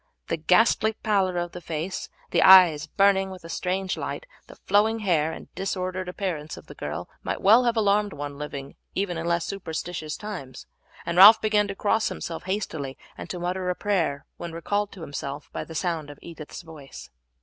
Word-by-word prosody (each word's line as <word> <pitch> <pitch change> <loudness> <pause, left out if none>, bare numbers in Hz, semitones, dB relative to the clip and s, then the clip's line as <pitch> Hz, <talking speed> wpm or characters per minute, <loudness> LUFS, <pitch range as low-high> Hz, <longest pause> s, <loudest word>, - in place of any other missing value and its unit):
The 165 - 0
ghastly 220 +6 +3
pallor 195 -4 0
of 175 0 -2
the 180 - -8
face, 165 +2 -4 0.2
the - - +3
eyes 175 -5 +8
burning 195 +2 +3
with 185 -2 -10
a 165 - -10
strange 185 +2 -2
light, - - -5 0.2
the - - -13
flowing 215 +2 +2
hair, 160 -6 +1
and - - -10
disordered 185 -1 -3
appearance 170 -5 -4
of - - -12
the - - -11
girl - - -5
might - - -3
well 225 +5 +6
have 235 -1 +1
alarmed 205 -1 +2
one 145 -2 -6
living 140 -2 -6
in - - -20 0.2
even 180 -4 -2
less 170 -1 0
superstitious 165 -4 -5
times, 185 -12 -8 0.4
and 170 +1 0
Ralph 210 +4 +11
began 210 -1 +2
to 200 - -5
cross 215 +2 +1
himself 165 -1 -6
hastily 160 -9 -3 0.2
and - - -9
to 180 - -4
mutter 180 +1 -2
a 180 - 0
prayer 170 -10 -1
when 170 -1 -7
recalled 205 +5 -2
to 190 - -11
himself 145 -1 -6
by - - -3
the 160 - -10
sound 160 -3 -2
of 145 - -10
Edith's 165 0 -9
voice. 150 - -12
180 Hz, 190 wpm, -25 LUFS, 160-200 Hz, 0.4 s, Ralph